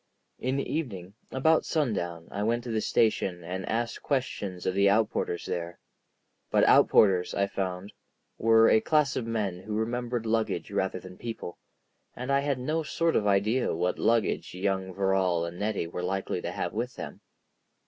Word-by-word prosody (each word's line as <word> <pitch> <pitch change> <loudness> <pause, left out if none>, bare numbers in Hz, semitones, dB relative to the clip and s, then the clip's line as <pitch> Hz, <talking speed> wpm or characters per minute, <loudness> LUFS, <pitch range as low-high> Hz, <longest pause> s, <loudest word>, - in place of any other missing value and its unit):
In 130 +2 -1
the 140 - -2
evening, 100 - -4 0.2
about 160 +5 +3
sundown, 85 - -2
I 100 - -3
went 115 +3 0
to 120 - -5
the 110 -1 0
station 95 -7 +1
and 90 +2 -5
asked 115 +1 -2
questions 105 -9 -2
of 95 - +1
the 100 +1 +4
outporters 105 -4 +1
there. 85 0 -4 0.7
But - - +3
outporters, 95 -4 +5
I 100 - +2
found, 95 0 -4 0.5
were 115 0 +6
a 110 - +5
class 150 -4 +2
of 115 - -2
men 105 -6 -2
who 105 +3 -5
remembered 120 +1 -2
luggage 110 0 -1
rather - - -1
than 90 0 -12
people, 115 -7 -6 0.6
and 125 +2 -4
I 140 - +4
had 140 -1 0
no 155 +6 -1
sort 165 +1 0
of 105 - +2
idea 105 +5 +2
what 90 +2 -1
luggage 115 -5 +1
young 95 0 -1
Verrall 95 -3 +1
and 85 +1 -7
Nettie 105 -3 -1
were 85 +1 -5
likely 95 +2 -2
to - - -4
have - - -3
with 120 +3 -3
them. - - -8
105 Hz, 170 wpm, -28 LUFS, 95-120 Hz, 0.7 s, were